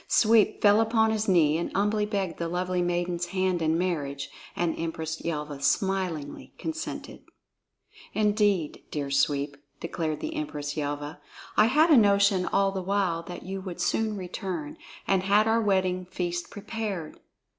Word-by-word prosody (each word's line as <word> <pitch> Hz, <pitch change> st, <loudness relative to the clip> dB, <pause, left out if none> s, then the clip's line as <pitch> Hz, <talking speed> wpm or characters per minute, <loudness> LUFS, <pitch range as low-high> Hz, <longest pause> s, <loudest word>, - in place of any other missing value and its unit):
Sweep 220 Hz, -1 st, +4 dB
fell 205 Hz, +1 st, +6 dB
upon 220 Hz, 0 st, +3 dB
his 220 Hz, 0 st, -1 dB
knee 165 Hz, -4 st, +4 dB
and 170 Hz, -, -3 dB
humbly 210 Hz, +1 st, +1 dB
begged 195 Hz, -5 st, -2 dB
the 170 Hz, -, -1 dB
lovely 180 Hz, +1 st, -1 dB
maiden's 175 Hz, 0 st, -1 dB
hand 185 Hz, -1 st, 0 dB
in 160 Hz, 0 st, +2 dB
marriage, 150 Hz, -6 st, -2 dB, 0.2 s
and 170 Hz, -2 st, 0 dB
Empress 160 Hz, -1 st, -3 dB
Yelva 150 Hz, -3 st, -4 dB
smilingly 175 Hz, -1 st, -1 dB
consented. 320 Hz, -1 st, -5 dB, 0.9 s
"Indeed, 205 Hz, -6 st, +1 dB
dear 140 Hz, -2 st, -3 dB
Sweep!" 140 Hz, +1 st, +1 dB, 0.2 s
declared 160 Hz, -2 st, -3 dB
the 315 Hz, -, -4 dB
Empress 150 Hz, -, -4 dB
Yelva, 145 Hz, +1 st, -4 dB, 0.4 s
"I 215 Hz, -, +6 dB
had 305 Hz, +7 st, +4 dB
a 295 Hz, -, +8 dB
notion 200 Hz, -3 st, +4 dB
all 195 Hz, 0 st, +2 dB
the 190 Hz, -1 st, -3 dB
while 185 Hz, -3 st, 0 dB
that 175 Hz, -, -7 dB
you 190 Hz, +1 st, -5 dB
would 185 Hz, -2 st, -7 dB
soon 220 Hz, -2 st, 0 dB
return, 180 Hz, -4 st, -5 dB, 0.3 s
and 195 Hz, -1 st, +3 dB
had 205 Hz, +3 st, +3 dB
our 225 Hz, +1 st, +3 dB
wedding 185 Hz, -3 st, +1 dB
feast 175 Hz, -1 st, -3 dB
prepared!" 205 Hz, -6 st, -5 dB
185 Hz, 150 wpm, -27 LUFS, 165-205 Hz, 0.9 s, a